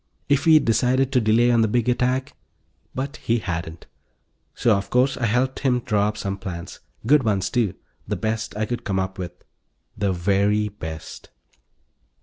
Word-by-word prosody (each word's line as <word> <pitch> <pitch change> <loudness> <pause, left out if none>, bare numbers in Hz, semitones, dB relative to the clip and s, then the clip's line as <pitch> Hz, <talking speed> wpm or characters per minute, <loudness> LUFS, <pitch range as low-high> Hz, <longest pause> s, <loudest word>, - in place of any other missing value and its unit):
If 140 -1 +2
he'd 160 -2 +6
decided 130 +3 +2
to 125 -3 +3
delay 115 +3 +4
on 115 -1 +4
the 110 - +3
big 120 +2 0
attack... 125 +2 0 0.6
but 140 +3 -4
he 115 - 0
hadn't. 85 -5 -5 0.7
So, 115 -4 +3
of 100 0 -3
course, 130 +2 +2
I 115 - -1
helped 125 +4 0
him 125 -3 +1
draw 105 -4 +1
up 105 0 -3
some 100 -1 -4
plans. 85 -3 -7 0.3
Good 145 +4 +5
ones, 100 -5 0
too; 110 -7 0 0.3
the - - -1
best 110 -1 -3
I 110 - 0
could 120 +1 -4
come 100 -4 -1
up 95 0 -2
with. 90 -1 -7 0.5
The 100 -1 0
very 100 +4 +1
best. 80 -6 -8
110 Hz, 170 wpm, -23 LUFS, 100-125 Hz, 0.7 s, he'd